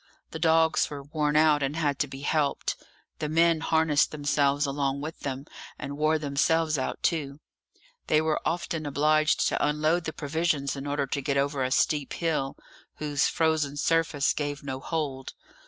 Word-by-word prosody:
The - - -6
dogs 160 -1 +3
were 145 -1 -7
worn 150 +1 -1
out, 155 -1 +4
and 140 +2 -1
had 145 -4 0
to 145 - +1
be 135 0 -9
helped; 145 -1 0 0.4
the 150 - -2
men 165 +1 +3
harnessed 160 -2 +2
themselves 145 -1 +1
along 140 0 -1
with 155 +2 -6
them, 135 0 -5 0.3
and 140 0 -6
wore 155 +2 +2
themselves 155 +2 +1
out 130 - -3
too. 145 -4 -1 0.7
They 155 - +4
were 155 0 0
often 165 -2 -2
obliged 155 +2 +2
to - - -1
unload 155 +3 +1
the 160 - -2
provisions 150 -2 -1
in 140 +1 -6
order 145 -1 0
to 140 +1 -3
get 140 0 -1
over 140 0 0
a 130 - 0
steep 145 +1 +1
hill, 155 -5 -1 0.4
whose 145 -2 0
frozen 155 -3 0
surface 160 -2 +1
gave 145 -1 -4
no 130 -2 -4
hold. 140 -4 -4
150 Hz, 170 wpm, -27 LUFS, 140-160 Hz, 0.7 s, out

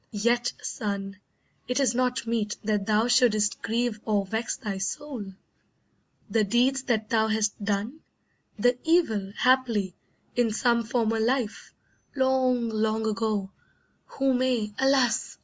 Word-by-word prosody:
Yet, 240 +3 +1
son, 200 -2 -4 0.5
it 250 +2 0
is 260 -4 +2
not 250 0 0
meet 225 -2 -1
that 210 -2 -1
thou 215 +2 +3
shouldst 215 -5 +3
grieve 230 -1 -1
Or 205 -3 0
vex 220 +4 -3
thy 205 -6 -4
soul. 245 +3 -4 1.0
The 225 -2 +2
deeds 245 +6 +2
that 220 -3 -1
thou 220 -1 +3
hast 215 -1 -1
done, 210 +8 -2 0.6
The 245 +3 +2
evil, 225 - +2
haply, 235 -8 +2 0.4
in 235 -3 +2
some 235 0 +2
former 225 -1 0
life, 235 -1 -1 0.4
Long, 260 -2 +2
long 220 0 0
ago, 215 -3 -1 0.6
who 270 -1 0
may 245 -4 0
alas! 265 -3 +2
225 Hz, 130 wpm, -26 LUFS, 210-250 Hz, 1.0 s, thou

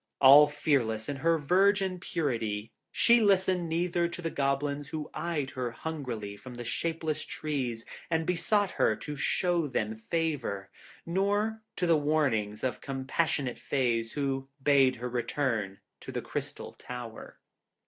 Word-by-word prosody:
All 140 +2 +9
fearless 135 -7 0
in 145 - -3
her 165 +4 +2
virgin 190 +4 +2
purity, 115 - -2 0.2
she 235 0 +5
listened 190 -4 +2
neither 170 +1 +1
to 170 +1 -7
the 165 - -1
Goblins 140 +1 -1
who 155 0 -5
eyed 155 -6 -2
her 125 -2 -3
hungrily 120 -7 -5
from 125 +4 -10
the 120 - -6
shapeless 160 +4 -2
trees 130 -7 -3 0.2
and 165 -1 +1
besought 185 +4 +1
her 110 - +2
to 150 +6 -6
show 170 +3 +1
them 110 -4 -2
favour, 120 -7 -2 0.3
nor 205 +5 0
to 180 - 0
the 165 -2 +4
warnings 135 -9 0
of 125 -4 -2
compassionate 135 0 -1
Fays 115 -4 0
who 135 -2 -2
bade 135 -2 +5
her 125 +2 -5
return 115 -5 -2 0.2
to - - -8
the - - -4
Crystal - - -5
Tower. 120 -2 -8
145 Hz, 140 wpm, -29 LUFS, 120-165 Hz, 0.3 s, All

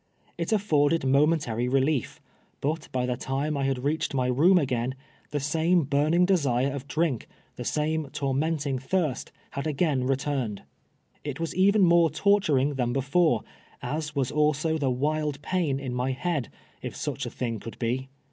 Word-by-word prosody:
It - - -3
alforded 165 -8 +2
momentary 135 -4 +2
relief. 135 +1 0 0.4
Init 150 +2 -2
by 125 -1 0
tlie 125 0 -2
time 140 +3 -1
I 140 -1 0
had 135 -1 0
roaelied 150 +3 -1
my 130 -1 +1
room 150 +10 +4
a;;';un. 130 -4 0 0.3
the 145 - -2
same 160 +3 +2
l)uriiiug 150 +6 +3
desire 140 -8 +2
of 140 -1 -6
drink, 150 -3 -1 0.3
the - - -6
same 155 -1 -1
tormenting 140 0 -1
thirst, 150 0 -1 0.2
had 140 +3 -3
again 145 -4 +1
returned. 135 -5 -1 0.6
It 145 -1 -5
was 165 -1 -2
even 200 +2 +4
more 170 -2 +5
torturing 155 -9 +2
than 125 -3 -1
before, 140 - +2 0.4
as 150 +4 -3
was 135 -1 0
also 150 +1 +1
the 140 -3 +1
wild 150 +2 -1
pain 165 -7 0
in 130 -3 -4
my 125 +1 -1
head, 150 -2 -2 0.3
if - - -6
such - - -3
a - - -3
thing 115 -3 -3
could 115 - -9
be. 130 +3 -2
145 Hz, 160 wpm, -27 LUFS, 130-160 Hz, 0.6 s, more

